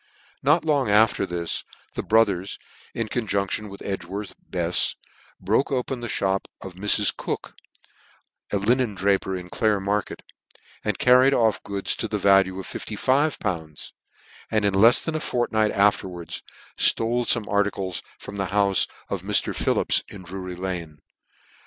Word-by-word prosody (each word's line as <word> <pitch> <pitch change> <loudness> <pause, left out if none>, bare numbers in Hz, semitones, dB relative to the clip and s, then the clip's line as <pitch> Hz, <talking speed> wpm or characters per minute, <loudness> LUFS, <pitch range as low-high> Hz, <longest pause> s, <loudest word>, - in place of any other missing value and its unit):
Not 150 +5 +3
Jong 145 -7 +2
after 105 -1 +4
this, 85 -1 -3 0.3
the - - -3
brothers, 100 -4 +2 0.4
in 115 -1 -2
conjunc 100 -4 -1
tion 105 -1 -2
with 100 - -10
Edgworth 95 +1 -5 0.2
Befs, 90 -1 +1 0.4
broke 105 +10 +1
open 130 -1 -2
the 120 - -4
(hop 95 -2 0
of 95 - -9
Mrs. 105 +2 +3
Cook, - - -5 1.0
a 100 - +1
linen 115 +2 +1
draper 95 0 +1
in 90 -1 -8
Clare 110 -3 +1
market, 100 +1 -2 0.6
and 105 -2 -1
carried 130 +2 +5
off 110 -2 +2
goods 100 -1 -2
to - - -2
the - - -2
value 95 -1 +4
of 95 - -6
fifty 110 - -6
five 140 +7 +2
pounds; 80 -7 -5 0.6
and 110 -2 +1
in 100 - +2
lefs 115 +6 +5
than 160 - -2
a 155 - -1
fortnight 110 -6 0
afterwards 95 -4 0 0.4
ftole 115 +2 +3
fome 115 -2 +2
articles 100 -3 -1 0.2
from 100 - -9
the 95 -1 -1
houie 100 0 +2 0.2
of - - -3
Mr, - - +1
Phillip's - - +2
in 95 - -10
Drury 90 0 -6
lane. 90 -4 -5
100 Hz, 150 wpm, -24 LUFS, 95-115 Hz, 1.0 s, carried